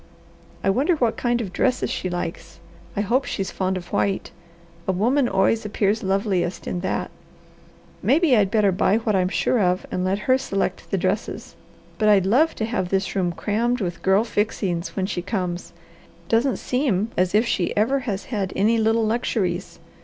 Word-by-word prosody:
I 195 - +3
wonder 285 - +2
what 240 -7 +1
kind 240 -1 0
of 190 -5 -6
dresses 255 -1 +1
she 185 - -2
likes. 175 -1 -5 0.4
I - - +2
hope 240 +6 +1
she's 195 - -3
fond 190 0 -1
of 175 -1 -9
white. 195 -1 0 0.6
A - - +3
woman 240 +8 +2
always 195 +4 +2
appears 210 0 0
loveliest 190 -2 -1
in 180 - -3
that. 190 - -2 0.9
Maybe 300 -2 +4
I'd 205 -4 +3
better 210 -2 +3
buy 190 +3 +2
what 220 -2 0
I'm 185 -1 +2
sure 240 - +1
of 180 -2 +1
and 180 - -1
let 190 +1 +1
her 260 0 +4
select 195 -7 -2
the 195 - 0
dresses. 190 +4 -2 0.4
But 215 -1 +3
I'd 200 -3 +5
love 265 +11 +3
to 220 - -2
have 220 -6 -2
this 195 +1 -1
room 180 -3 +1
crammed 230 +8 -1
with 175 -5 -3
girl 190 +3 +3
fixings 200 -6 -2
when 190 - 0
she 185 -2 -3
comes. 180 -2 -3 0.6
Doesn't 235 +3 +2
seem 230 -6 0
as 180 +2 +1
if 220 +3 +4
she 180 -6 0
ever 250 +7 +2
has 210 -7 -4
had 200 -5 -2
any 220 +4 +3
little 225 +1 +2
luxuries. 210 -5 -1
205 Hz, 180 wpm, -23 LUFS, 185-230 Hz, 0.9 s, I'd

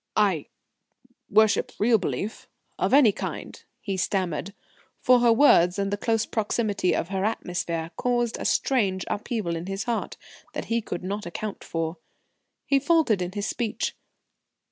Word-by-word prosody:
"I 195 -8 +2 0.8
worship 215 0 +3
real 225 +1 +4
belief 185 - -4 0.3
of - - +1
any 265 -5 +7
kind," - - -6 0.2
he 195 -3 -3
stammered, 185 0 -1 0.4
for 250 -1 +5
her 240 -1 +5
words 210 -8 +5
and 200 0 -1
the - - +3
close 225 +1 0
proximity 210 -3 0
of 170 - -2
her 195 -1 -1
atmosphere 175 -5 -2
caused 240 -1 0
a - - -5
strange 195 -8 +1
upheaval 205 -5 -2
in 165 +2 -5
his 195 +1 -3
heart 235 -2 -3 0.4
that - - -4
he 230 - +2
could 180 - -5
not 200 +1 -4
account 205 +4 -5
for. 165 0 -3 0.7
He 275 -1 +3
faltered 285 - +3
in 180 +1 -3
his 205 0 -3
speech. 225 0 -2
205 Hz, 150 wpm, -26 LUFS, 185-230 Hz, 0.8 s, any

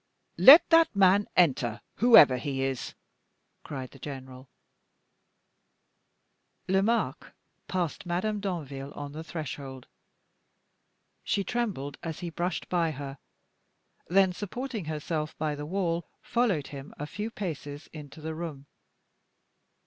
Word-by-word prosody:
"Let 290 +6 +10
that 330 -7 +5
man 200 +1 +5
enter, 125 -9 +3 0.2
whoever 205 - +7
he 135 +1 -3
is!" 135 -2 -3 0.7
cried 130 -3 -6
the 135 - -15
general. 130 -2 -9 2.2
Lomaque 195 +5 +1 0.4
passed 175 -1 -3
Madame 205 +5 -1
Danville 145 -8 -5
on 145 -1 -6
the 155 +2 -7
threshold. 140 -5 -7 1.4
She 200 - 0
trembled 190 - -3
as 165 +1 -6
he 175 -1 -4
brushed 175 +2 -3
by 170 -2 +1
her; 140 -2 -7 0.9
then, 190 0 +4
supporting 220 +2 -5
herself 155 0 -3
by 155 -1 -1
the 145 0 -6
wall, 170 -2 -1 0.2
followed 205 - 0
him 140 0 -9
a 145 - -4
few 210 +8 -5
paces 155 -8 -6
into 150 0 -10
the 160 +1 -4
room. 155 -4 -6
160 Hz, 115 wpm, -28 LUFS, 140-190 Hz, 2.2 s, Let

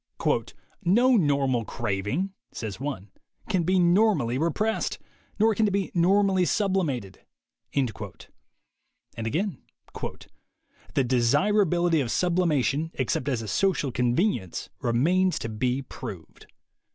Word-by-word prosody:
"No 240 +8 +4
normal 140 - +2
craving," 115 - -2 0.2
says 110 -3 -6
one, 130 -9 -5 0.4
"can 190 -4 +2
be 185 +3 +2
normally 175 - +3
repressed. 210 +8 0 0.4
Nor 220 +1 +4
can 215 +1 +2
it - - 0
be 195 0 -1
normally 190 +2 +3
sublimated." 170 - -1 0.6
And 130 -5 +1 1.2
again: 155 - -2 1.3
"The 135 - +3
desir 130 - +3
ability 175 -3 +2
of 125 - -2
sublimation, 160 -3 +1
except 130 +1 -1
as 120 -4 -1
a - - -7
social 150 - +1
conven 125 - +2
ience, 95 -3 -8
remains 175 +11 +2
to 115 - -4
be 125 +4 -1
proved." - - -9
155 Hz, 115 wpm, -26 LUFS, 125-190 Hz, 1.3 s, No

